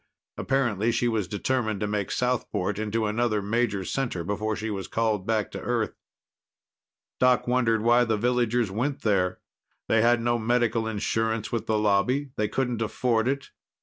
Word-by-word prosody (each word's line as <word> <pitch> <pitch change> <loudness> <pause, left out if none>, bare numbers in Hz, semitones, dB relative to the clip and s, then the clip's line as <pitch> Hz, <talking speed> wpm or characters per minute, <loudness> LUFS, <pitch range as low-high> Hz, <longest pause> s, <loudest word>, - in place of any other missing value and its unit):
Apparently, 120 -5 0
she 120 +1 +1
was 110 -5 0
determined 110 +1 -1
to 105 - -1
make 105 -1 -2
Southport 110 -5 -1
into 110 +1 -1
another 110 0 +1
major 105 -1 -1
center 120 -10 -2
before 105 +4 -2
she 110 +1 -4
was 95 -2 -4
called 110 -4 -1
back 110 -2 0
to - - -6
Earth. 115 -4 -1 1.3
Doc 125 -1 +4
wondered 115 -3 +2
why 120 +1 +5
the 110 -2 0
villagers 120 -1 +1
went 130 +8 -2
there. 95 -4 +1 0.5
They 115 - +3
had 120 +1 +4
no 120 0 +1
medical 115 -1 +1
insurance 110 +1 -1
with 115 - -2
the 110 - +2
Lobby; 110 +7 +1
they 105 - 0
couldn't 125 -1 -1
afford 115 +1 0
it. 140 +1 -2
115 Hz, 160 wpm, -26 LUFS, 105-120 Hz, 1.3 s, why